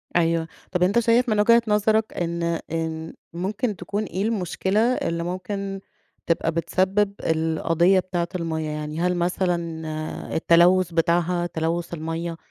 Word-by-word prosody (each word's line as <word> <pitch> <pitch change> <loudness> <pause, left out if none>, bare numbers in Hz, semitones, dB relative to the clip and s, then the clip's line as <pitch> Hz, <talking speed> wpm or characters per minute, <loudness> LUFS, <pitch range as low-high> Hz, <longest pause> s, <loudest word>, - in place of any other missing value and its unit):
أيوه، 165 -1 +2 0.2
طب 180 -1 +1
أنت 200 +6 +3
شايف 235 +2 +3
من 215 -1 +2
وجهة 230 +3 +6
نظرك 215 +1 +2
إن 170 -1 -2 0.3
إن 160 0 -3 0.2
ممكن 200 +6 -2
تكون 200 +4 -3
إيه 190 0 -3
المشكلة، 200 -2 0
اللي 220 -8 +1
ممكن 195 +2 -4 0.5
تبقى 165 -1 +1
بتسبب 190 +5 +1
القضية 165 +3 +2
بتاعة 175 -2 -2
المَيَّة؟ 160 -2 -2
يعني 150 +1 -4
هل 180 0 +1
مثلًا 170 -3 -2
التلوث 175 +2 +4
بتاعها 175 +1 +1
تلوث 165 +1 -2
المَيَّة، 165 +1 -4
175 Hz, 130 wpm, -24 LUFS, 165-195 Hz, 0.5 s, وجهة